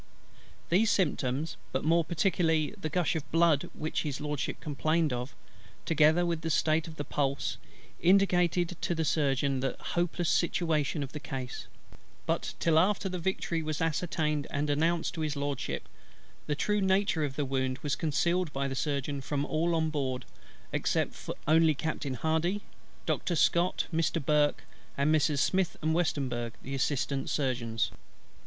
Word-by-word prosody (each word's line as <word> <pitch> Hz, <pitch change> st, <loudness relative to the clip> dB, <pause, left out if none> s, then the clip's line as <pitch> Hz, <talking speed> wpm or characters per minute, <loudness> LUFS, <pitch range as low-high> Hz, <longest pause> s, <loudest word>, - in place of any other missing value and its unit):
These 205 Hz, +6 st, +4 dB
symptoms, 150 Hz, -4 st, 0 dB
but 130 Hz, -, -1 dB
more 165 Hz, +2 st, +4 dB
particularly 160 Hz, -2 st, +1 dB
the 175 Hz, -6 st, -4 dB
gush 175 Hz, 0 st, +1 dB
of 155 Hz, -2 st, -4 dB
blood 165 Hz, -3 st, +3 dB
which 155 Hz, +1 st, -2 dB
His 145 Hz, -3 st, -3 dB
LORDSHIP 150 Hz, -2 st, -3 dB
complained 155 Hz, +1 st, 0 dB
of, 125 Hz, +2 st, -4 dB, 0.5 s
together 160 Hz, +2 st, +4 dB
with 170 Hz, -2 st, -1 dB
the 165 Hz, -, -2 dB
state 155 Hz, 0 st, +2 dB
of 160 Hz, -1 st, -10 dB
his 145 Hz, -, -3 dB
pulse, 140 Hz, -1 st, -1 dB, 0.4 s
indicated 180 Hz, -2 st, +3 dB
to 175 Hz, -, 0 dB
the 160 Hz, -1 st, 0 dB
Surgeon 140 Hz, -3 st, +1 dB
the 135 Hz, +1 st, -1 dB
hopeless 175 Hz, 0 st, -1 dB
situation 160 Hz, -4 st, +1 dB
of 135 Hz, -, -6 dB
the 150 Hz, -, -6 dB
case; 130 Hz, -3 st, -6 dB, 0.6 s
but -, -, -1 dB
till 160 Hz, -1 st, +4 dB
after 195 Hz, +2 st, +2 dB
the 180 Hz, -1 st, -3 dB
victory 170 Hz, -2 st, -1 dB
was 155 Hz, -1 st, -3 dB
ascertained 155 Hz, -2 st, 0 dB
and 145 Hz, +1 st, -1 dB
announced 165 Hz, +3 st, +1 dB
to 165 Hz, -, -4 dB
His 155 Hz, -1 st, -1 dB
LORDSHIP, 140 Hz, -1 st, -3 dB, 0.6 s
the 150 Hz, -, 0 dB
true 210 Hz, +7 st, +1 dB
nature 190 Hz, -3 st, +2 dB
of 140 Hz, -2 st, -2 dB
his 145 Hz, -, -1 dB
wound 130 Hz, -1 st, -1 dB
was 145 Hz, -2 st, 0 dB
concealed 170 Hz, +3 st, 0 dB
by 135 Hz, 0 st, -1 dB
the 135 Hz, -, -3 dB
Surgeon 140 Hz, 0 st, -2 dB
from 140 Hz, +1 st, -2 dB
all 165 Hz, +3 st, +1 dB
on 160 Hz, -1 st, +1 dB
board 130 Hz, -4 st, -2 dB, 0.5 s
except -, -, -1 dB, 0.2 s
only 160 Hz, 0 st, +5 dB
Captain 140 Hz, -3 st, -3 dB
HARDY, 160 Hz, -, 0 dB, 0.4 s
Doctor 175 Hz, -, 0 dB
SCOTT, 170 Hz, +3 st, +2 dB
Mr. 160 Hz, -2 st, 0 dB
BURKE, 150 Hz, 0 st, +2 dB, 0.3 s
and 140 Hz, +2 st, +2 dB
Messrs. 150 Hz, -2 st, +3 dB
SMITH 190 Hz, -2 st, +1 dB
and 160 Hz, +1 st, +2 dB
WESTEMBURG 130 Hz, -8 st, -1 dB
the 135 Hz, -, -6 dB
Assistant 135 Hz, 0 st, -1 dB
Surgeons. 120 Hz, -5 st, 0 dB
155 Hz, 155 wpm, -30 LUFS, 140-170 Hz, 0.6 s, only